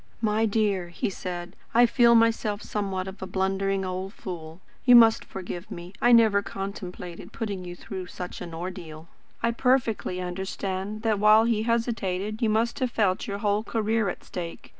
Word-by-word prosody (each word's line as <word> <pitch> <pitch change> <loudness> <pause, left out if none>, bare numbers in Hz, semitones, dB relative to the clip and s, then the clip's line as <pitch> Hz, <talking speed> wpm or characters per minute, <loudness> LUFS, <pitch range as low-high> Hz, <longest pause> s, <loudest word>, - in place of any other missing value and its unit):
"My 220 0 +2
dear," 200 -4 +1
he 175 +3 -2
said, 180 -1 -6 0.2
"I 240 +1 +7
feel 235 -1 +5
myself 225 -2 +2
somewhat 195 -3 -3
of 190 +1 -9
a 190 - -4
blundering 195 +1 0
old 185 +2 -4
fool. 170 -6 -8 0.2
You 245 -1 +7
must 225 -2 +7
forgive 180 -1 -7
me. 175 +2 -8
I 240 - +5
never 220 -4 +6
contemplated 185 -3 -7
putting 205 -5 -4
you 175 0 -7
through 185 -1 -7
such 180 0 -7
an 170 - -6
ordeal. 165 -2 -7 0.3
I 235 - +3
perfectly 235 -7 +1
understand 190 +3 -4
that, 220 -3 +1
while 215 +1 +6
he 230 -2 +1
hesitated, 220 -3 -1
you 225 - +3
must 225 +4 +1
have 255 -2 +1
felt 200 -5 0
your 200 - -3
whole 205 0 +1
career 220 -2 0
at - - -6
stake. 170 -2 -7
200 Hz, 170 wpm, -26 LUFS, 185-225 Hz, 0.3 s, I